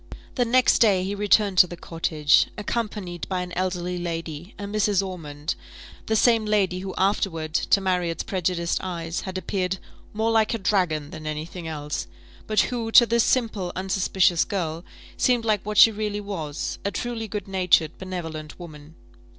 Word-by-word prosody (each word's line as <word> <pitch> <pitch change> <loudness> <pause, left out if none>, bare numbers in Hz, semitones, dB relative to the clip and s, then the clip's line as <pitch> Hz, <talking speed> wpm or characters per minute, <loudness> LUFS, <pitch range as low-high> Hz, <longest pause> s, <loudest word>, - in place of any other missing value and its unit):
The 245 - +1
next 250 +2 +4
day 200 -5 +4
he 195 +2 -2
returned 205 -1 +3
to 180 - +8
the 175 - -8
cottage, 160 -3 +2
accompanied 210 -5 -4
by 185 -1 -1
an 180 - -8
elderly 180 -1 -2
lady, 165 0 -5
a 205 - -7
Mrs. 200 -1 +1
Ormond; 150 -5 -5 0.5
the 220 - +1
same 225 0 +4
lady 200 -4 +1
who 190 0 -6
afterward, 180 -5 0
to 200 - +3
Marriott's 180 -3 -1
prejudiced 175 -2 -1
eyes, 170 -2 -4
had 190 -1 -5
appeared 185 0 -2 0.3
more 220 +2 0
like 220 0 +2
a - - -1
dragon 180 -8 0
than 155 -1 -8
any 155 0 -3
thing 170 0 -8
else, 150 -2 -4 0.4
but 215 0 +3
who, 230 -2 -2
to 240 - +9
this 235 0 +2
simple, 220 -8 0
unsuspicious 185 -2 +2
girl, 170 -4 -3 0.3
seemed 245 -2 +2
like 215 -3 +1
what 210 0 -4
she 225 - +9
really 210 -1 -3
was, 170 -8 -4
a 200 - 0
truly 230 +1 -4
good 205 -1 -5
natured, 180 -4 +2
benevolent 165 -5 -6
woman. 155 -2 -11
185 Hz, 165 wpm, -24 LUFS, 170-210 Hz, 0.5 s, to